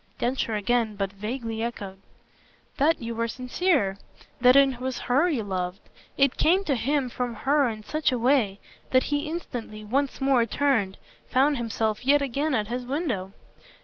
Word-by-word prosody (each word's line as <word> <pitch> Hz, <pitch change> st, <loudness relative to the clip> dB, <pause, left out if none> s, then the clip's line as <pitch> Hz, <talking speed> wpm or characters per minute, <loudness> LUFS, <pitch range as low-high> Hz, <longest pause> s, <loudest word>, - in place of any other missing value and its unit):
Densher 240 Hz, -2 st, -1 dB
again 220 Hz, +1 st, 0 dB
but 195 Hz, -1 st, -3 dB
vaguely 225 Hz, +2 st, -4 dB
echoed. 200 Hz, -5 st, -5 dB, 0.8 s
"That 300 Hz, -1 st, +2 dB
you 230 Hz, 0 st, -3 dB
were 230 Hz, 0 st, -1 dB
sincere. 250 Hz, -, 0 dB, 0.4 s
That 250 Hz, +1 st, +6 dB
it 270 Hz, -3 st, +4 dB
was 260 Hz, -1 st, -2 dB
HER 280 Hz, +8 st, +2 dB
you 265 Hz, -9 st, -1 dB
loved." 185 Hz, -1 st, -3 dB, 0.4 s
It 275 Hz, -2 st, +3 dB
came 365 Hz, +5 st, +3 dB
to 300 Hz, -, 0 dB
him 270 Hz, +2 st, 0 dB
from 245 Hz, -1 st, -3 dB
her 280 Hz, +3 st, +2 dB
in 215 Hz, -1 st, -7 dB
such 305 Hz, +7 st, 0 dB
a 250 Hz, -, 0 dB
way 235 Hz, -5 st, +2 dB, 0.3 s
that 255 Hz, 0 st, +4 dB
he 290 Hz, +1 st, -1 dB
instantly, 235 Hz, -10 st, -6 dB
once 275 Hz, +5 st, -1 dB
more, 265 Hz, -4 st, +3 dB
turned, 225 Hz, -8 st, +1 dB, 0.3 s
found 275 Hz, +3 st, +3 dB
himself 225 Hz, -1 st, -2 dB
yet 285 Hz, +2 st, +4 dB
again 280 Hz, +2 st, -1 dB
at 215 Hz, -3 st, 0 dB
his 245 Hz, +2 st, -3 dB
window. 245 Hz, -, -3 dB
245 Hz, 165 wpm, -26 LUFS, 220-275 Hz, 0.8 s, That